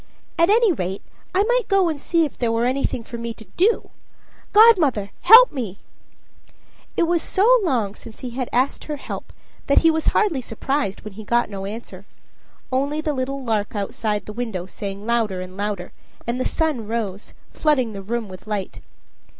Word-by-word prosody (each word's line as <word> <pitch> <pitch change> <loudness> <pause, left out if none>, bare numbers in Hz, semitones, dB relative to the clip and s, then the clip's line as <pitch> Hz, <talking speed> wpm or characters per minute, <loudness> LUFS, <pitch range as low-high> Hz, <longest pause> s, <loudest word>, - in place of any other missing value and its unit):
At 335 - +5
any 450 0 +5
rate, 190 - -4 0.3
I 390 - +4
might - - +1
go 390 -2 +3
and 305 -4 -3
see 335 -2 +2
if 290 - -7
there 235 -2 0
were 230 +1 +1
anything 255 -2 -1
for 235 +1 -8
me 230 -1 -5
to 220 - -13
do. 420 +6 +2 0.6
Godmother, 330 - +5
help 485 +3 +9
me!" 220 -9 -4 1.2
It - - +4
was 335 0 +2
so 475 +6 +4
long 240 - 0
since 225 +1 -12
he 250 -2 -5
had 250 0 -4
asked 255 +3 0
her 300 - -3
help 285 - -7 0.4
that 280 - +4
he 325 - +7
was 320 0 -1
hardly 365 -11 +2
surprised 245 -1 -2
when 215 -2 -9
he 220 +2 -9
got 235 +1 +1
no 195 -1 -5
answer 200 -2 -8 0.6
only 280 +4 0
the 310 -1 -1
little 270 +1 -3
lark 220 -3 -1
outside 210 +1 -2
the 210 - -7
window 220 -6 -4
sang 200 +2 -7
louder 225 -5 0
and 185 0 -8
louder, 200 -3 -3 0.3
and 240 +2 -2
the 255 - -1
sun 300 -10 -1
rose, 210 -3 -4 0.2
flooding 260 -8 +1
the 195 - -6
room 225 +3 -3
with 185 +2 -12
light. 205 -3 -4
240 Hz, 185 wpm, -22 LUFS, 210-310 Hz, 1.2 s, help